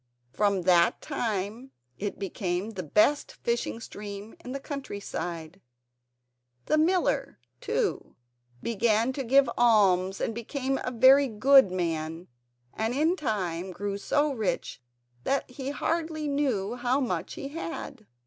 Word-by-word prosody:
From 200 -3 +1
that 175 -1 +4
time 225 -2 -3 0.3
it 205 0 -3
became 190 +1 -3
the 190 -4 -5
best 210 - +2
fishing 235 -1 -1
stream 205 -1 -8
in 250 - -7
the 275 - -3
country 275 -7 -6
side. 175 -2 -6 1.0
The 310 - +2
miller, 355 +3 +1 0.2
too, 450 -5 -2 0.5
began 230 +2 +1
to 270 - -3
give 270 +2 +4
alms 195 -5 +4
and - - -1
became 265 +4 -2
a - - -1
very 260 +3 +6
good 260 -1 +5
man, 165 -1 -3 0.4
and 225 +3 -1
in 315 +5 +2
time 190 - -2
grew 200 +2 -4
so 290 +7 +1
rich 220 - -2 0.4
that 275 0 0
he 265 +1 -5
hardly 315 +1 -2
knew 260 -8 0
how 250 +2 +1
much 255 -4 -2
he 275 - -6
had. 285 -7 -6
230 Hz, 130 wpm, -28 LUFS, 195-275 Hz, 1.0 s, very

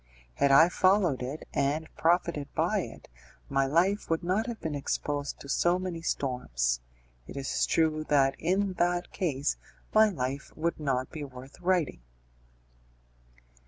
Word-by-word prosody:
Had 140 - +2
I 150 +4 +8
followed 185 -6 +3
it, 135 +5 -5
and 145 +3 0
profited 165 -4 +1
by - - +2
it, - - -7 0.4
my 135 0 +2
life 180 +8 +2
would 165 +1 0
not 190 +6 0
have 235 -2 -5
been 160 - -3
exposed 145 0 -2
to - - -10
so 175 +5 +2
many 180 -3 -4
storms; - - -1 0.5
it - - -8
is 135 -1 0
true 155 -1 +2
that 135 -2 +3
in 190 +3 +1
that 175 0 +1
case, 150 -7 -1 0.4
my 220 0 +6
life 140 -6 -4
would 165 +1 -1
not 130 -4 -1
be 155 - -6
worth 130 0 -11
writing. 175 - +1
155 Hz, 145 wpm, -29 LUFS, 135-175 Hz, 0.5 s, I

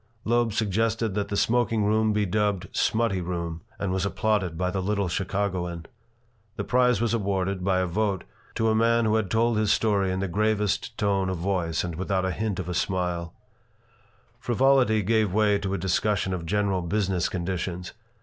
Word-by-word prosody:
Loeb 120 0 +2
suggested 110 +1 0
that 100 0 -1
the 100 - -2
smoking 115 -2 +2
room 110 +1 +2
be 105 0 +1
dubbed 100 -2 0
"smutty 110 -5 +1
room" 85 -2 -4 0.2
and 100 -2 -2
was 95 0 0
applauded 100 -4 0
by 90 +1 0
the 95 0 -2
little 100 0 0
Chicagoan. 90 -2 -2 0.7
The 105 - -3
prize 125 -1 +3
was 115 0 0
awarded, 100 -3 -1
by 95 -1 +2
a - - +1
vote, 100 +2 -1 0.3
to 110 -1 +1
a - - +3
man 115 +1 +3
who 110 - +2
had 110 -4 +1
told 115 +2 +2
his 110 -1 +2
story 100 -4 +2
in 95 - -2
the 95 - -1
gravest 105 +2 0
tone 100 -2 +1
of 95 - -2
voice 85 -2 -1
and 90 -1 -4
without 95 +2 -1
a 95 - 0
hint 105 0 -2
of 90 - -4
a 90 - -3
smile 90 -2 -2 1.0
Frivolity 125 -3 +3
gave 110 -1 +2
way 105 -2 +3
to 95 -1 -2
a - - -1
discussion 95 +1 0
of 85 -2 -4
general 100 -1 +1
business 95 0 0
conditions. 90 0 -4
100 Hz, 180 wpm, -26 LUFS, 90-110 Hz, 1.0 s, prize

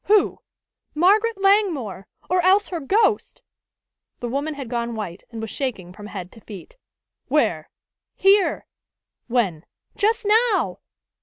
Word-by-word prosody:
Who?" 420 -1 +3 0.6
"Margaret 410 +6 +3
Langmore! 350 - +1 0.2
Or 365 +1 +2
else 385 +3 +3
her 345 - -3
ghost!" 415 - +1 0.8
The 240 - -4
woman 285 +5 -2
had 275 -3 -6
gone 235 -1 -3
white, 190 -4 -6
and 230 - -8
was 225 -2 -5
shaking 205 -10 -4
from 205 +1 -10
head 185 -3 -7
to 225 - -16
feet. 215 - -11 0.5
"Where?" - - +1 0.5
"Here." 390 0 +3 0.6
"When?" 200 -10 0 0.3
"Just 450 +2 +1
now!" 440 0 +2
290 Hz, 130 wpm, -22 LUFS, -, 0.8 s, Who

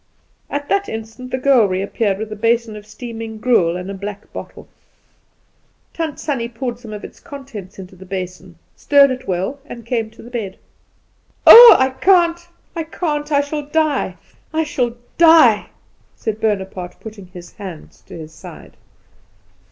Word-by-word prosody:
At 285 0 -4
that 400 0 0
instant 225 +3 -7
the 260 - -2
girl 255 -5 +4
reappeared 195 +2 -1
with 215 +1 -6
a - - -4
basin 230 +1 0
of 210 0 -11
steaming 225 0 -8
gruel 215 -8 +2
and 180 +1 -7
a 200 - -5
black 200 +1 -8
bottle. - - -9 1.3
Tant 320 -3 -4
Sannie 255 -6 -3
poured 240 0 -5
some 230 -3 -11
of 210 -1 -8
its - - -11
contents 245 -10 -10
into 185 -1 -11
the 190 +1 -14
basin, 185 -1 -6 0.2
stirred 280 -1 +4
it 255 0 -6
well, 190 +10 -2
and 235 -6 -10
came 230 -2 -2
to 220 - -16
the 240 - -13
bed. 215 -6 -5 0.9
"Oh, 475 0 +12
I 260 0 +2
can't, 345 +2 +2 0.3
I 330 - -2
can't! 310 -2 -3
I 285 -1 +3
shall 285 0 -5
die! 310 -1 0 0.3
I 320 0 0
shall 245 -6 -2 0.2
die!" 320 -11 +6 0.5
said 220 -1 -4
Bonaparte, 190 -4 -3
putting 215 -4 -11
his 180 -1 -12
hands 185 -6 -10
to - - -10
his 160 -1 -10
side. - - -13
230 Hz, 160 wpm, -18 LUFS, 200-285 Hz, 1.3 s, Oh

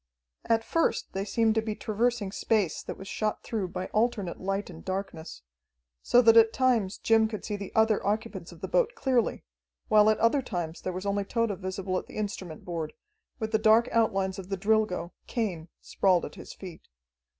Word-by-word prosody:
At 225 -1 +2
first 330 +7 0
they 195 - -2
seemed 225 +1 +2
to 220 - +1
be 220 -1 -3
traversing 220 -1 -1
space 205 -5 0
that - - -7
was 195 - -9
shot 215 +1 -2
through 215 -5 -2
by 185 +1 -4
alternate 215 -5 0
light 195 +1 -2
and 160 - -12
darkness, 185 - -5 0.6
so 245 +1 +4
that 225 0 +7
at 225 -1 +7
times 230 -7 +1
Jim 225 -1 +3
could 215 -1 -6
see 210 - -2
the 200 -2 -7
other 220 -1 +3
occupants 210 +2 -2
of - - -14
the - - -3
boat - - +2
clearly, 260 - 0 0.5
while 210 0 +6
at 215 - +3
other 230 +5 +3
times 175 -9 -4
there 185 - -3
was 185 +2 -5
only 200 0 0
Tode 230 0 0
visible 185 0 -2
at - - -12
the - - -10
instrument 195 -6 -5
board, 165 -3 -4 0.4
with 220 0 -3
the 220 - +2
dark 225 +2 +5
outlines 195 -4 +1
of 190 0 -9
the 195 - -2
Drilgo, 210 -3 +1 0.2
Cain, 190 -9 -2
sprawled 185 -3 +2
at - - -9
his - - -10
feet. 180 -4 -11
210 Hz, 195 wpm, -28 LUFS, 190-225 Hz, 0.6 s, that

